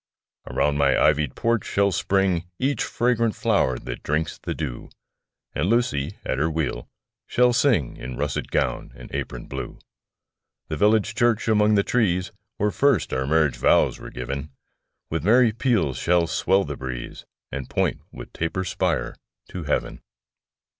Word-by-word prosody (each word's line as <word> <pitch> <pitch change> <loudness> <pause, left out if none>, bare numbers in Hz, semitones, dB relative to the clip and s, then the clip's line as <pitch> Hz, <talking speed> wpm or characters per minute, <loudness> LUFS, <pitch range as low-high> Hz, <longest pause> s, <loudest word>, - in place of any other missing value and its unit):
Around 75 0 +1
my 70 -1 +3
ivy'd 75 -3 +2
porch 115 -2 +1
shall 100 0 +1
spring 95 -1 +1
Each 140 +2 0
fragrant 115 -2 +1
flower 65 -1 +1
that - - -7
drinks 75 +1 -2
the - - -4
dew; 70 -7 -5 0.6
And 80 +7 0
Lucy, 105 - 0
at 65 - -1
her 80 +3 +2
wheel, 75 -6 -3 0.4
shall 125 0 +3
sing 120 - +2
In 65 -1 -7
russet 75 -1 -2
gown - - -1
and - - -12
apron - - -4
blue. - - -6 0.9
The - - -2
village 105 +6 +3
church, 120 -2 +1
among 105 -1 +4
the 100 - +4
trees, 95 -7 +1 0.3
Where 105 +1 +1
first 140 0 +2
our 65 +1 -1
marriage 75 -3 +2
vows - - +3
were - - -8
giv'n, 70 +4 -5 0.6
With - - -1
merry 115 +4 +5
peals 110 - 0
shall 85 -1 +3
swell 95 +4 +2
the 75 0 -5
breeze, 65 -2 -6 0.3
And 70 -2 -5
point - - 0
with - - -10
taper 80 +3 -2
spire 90 - -1 0.4
to 90 -4 -6
heav'n. 70 -4 -2
85 Hz, 155 wpm, -24 LUFS, 70-110 Hz, 0.9 s, merry